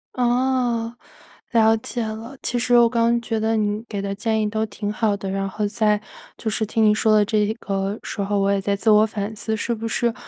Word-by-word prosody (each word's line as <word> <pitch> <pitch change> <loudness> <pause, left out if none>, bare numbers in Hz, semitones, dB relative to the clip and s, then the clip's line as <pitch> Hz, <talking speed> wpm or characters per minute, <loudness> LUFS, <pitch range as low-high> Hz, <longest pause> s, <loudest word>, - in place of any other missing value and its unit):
哦， 245 -2 +1 0.6
了 225 -1 +4
解 225 +1 -4
了。 225 +5 -7
其 245 - -1
实 245 0 +3
我 235 -1 +6
刚 230 -1 +1
刚 235 0 +2
觉 225 -1 -2
得 225 +1 +1
你 210 0 0
给 200 -2 -4
的 200 0 -3
建 220 +2 -1
议 210 - 0
都 220 +1 -1
挺 205 0 -5
好 215 -1 0
的。 195 -1 -5
然 195 0 -2
后 210 +2 -2
在 210 0 +1 0.4
就 220 - -3
是 220 +1 -1
听 220 +1 0
你 210 0 +5
说 215 0 +3
的 210 - +5
这 210 -1 +1
个 195 +1 -2
时 - - -7
候， 200 +1 0
我 195 0 +2
也 200 - +1
在 200 +1 0
自 210 +3 0
我 215 0 +6
反 210 0 -4
思， 220 +1 -2
是 235 +2 -2
不 225 0 -4
是 235 +1 0
220 Hz, 250 characters per minute, -22 LUFS, 205-230 Hz, 0.6 s, 我